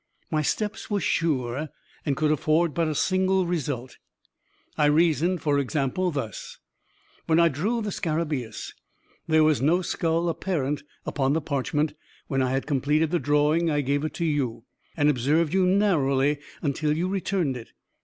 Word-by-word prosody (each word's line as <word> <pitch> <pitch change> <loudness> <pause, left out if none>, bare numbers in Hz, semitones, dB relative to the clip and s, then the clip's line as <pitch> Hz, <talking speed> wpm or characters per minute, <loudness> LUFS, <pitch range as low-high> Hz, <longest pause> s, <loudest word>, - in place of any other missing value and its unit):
My 155 -1 +1
steps 210 +8 -2
were 205 -1 +1
sure, 145 -5 0 0.4
and 140 - +1
could 155 -1 +2
afford 155 +2 +2
but 165 +3 +1
a 155 - -2
single 185 +2 +2
result 140 -7 -3 0.8
I 150 - +3
reasoned, 165 +3 +2
for 145 -2 +2
example, 140 +6 0
thus: 135 - -5 0.7
When 160 0 +4
I 170 0 +5
drew 210 - -1
the 210 - -3
scarabaeus, 155 -9 -3 0.5
there 160 -1 +4
was 155 -3 +3
no 170 +6 +3
skull 165 0 0
apparent 155 -4 -1 0.2
upon 135 -1 0
the 160 - +2
parchment 150 +2 -1 0.3
When 135 -2 -1
I 130 - +1
had 135 +1 -1
completed 150 +2 +1
the 175 - +2
drawing 150 +4 +2
I 145 -1 +1
gave 140 +2 0
it 155 -2 -3
to 170 - -1
you, 135 -8 -1 0.3
and 145 -1 +3
observed 150 +4 +2
you 190 -1 +3
narrowly 150 -8 +2 0.2
until 150 +1 0
you 175 +2 0
returned 185 -6 -1
it. 120 -2 -9
155 Hz, 160 wpm, -25 LUFS, 140-170 Hz, 0.8 s, I